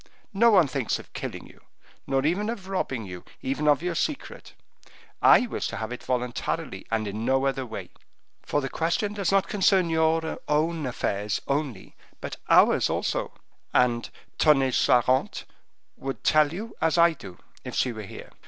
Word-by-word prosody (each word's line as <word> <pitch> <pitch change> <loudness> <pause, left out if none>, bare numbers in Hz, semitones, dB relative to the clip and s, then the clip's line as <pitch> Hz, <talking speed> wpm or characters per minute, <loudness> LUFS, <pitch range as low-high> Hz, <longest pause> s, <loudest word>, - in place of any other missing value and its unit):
No 230 +4 +5
one 190 -7 +6
thinks 130 -3 -1
of - - -14
killing - - -6
you, - - -18 0.5
nor 135 0 +1
even 195 +7 0
of 200 -5 -5
robbing 135 - -2
you, 90 -2 -8 0.2
even 140 +3 -1
of 150 +1 +4
your 180 -1 -1
secret; 285 - -4 0.7
I 250 - +7
wish 235 - -3
to - - -5
have 110 +2 -4
it 125 - -6
voluntarily, 125 -1 -3
and 110 -1 -1
in 105 +2 -4
no 135 +2 +2
other 135 -1 -1
way; 115 - -7 0.5
for 145 - -1
the 135 - -3
question 170 +8 -1
does 200 -3 -1
not 195 -1 +3
concern 190 -3 +2
your 160 0 +1
own 155 0 0
affairs 105 -4 -2
only, 140 -8 -3 0.2
but - - -6
ours - - +5
also; - - -1 0.4
and 120 -2 +2 0.3
Tonnay 135 -4 +4
Charente 125 +2 +2 0.5
would 135 0 -6
tell 155 -1 +4
you 215 +6 -7
as 160 +1 +2
I 170 0 +6
do, 95 - -11 0.3
if - - -7
she 125 - +1
were 110 -2 -7
here. 100 - -10
145 Hz, 170 wpm, -26 LUFS, 125-170 Hz, 0.7 s, I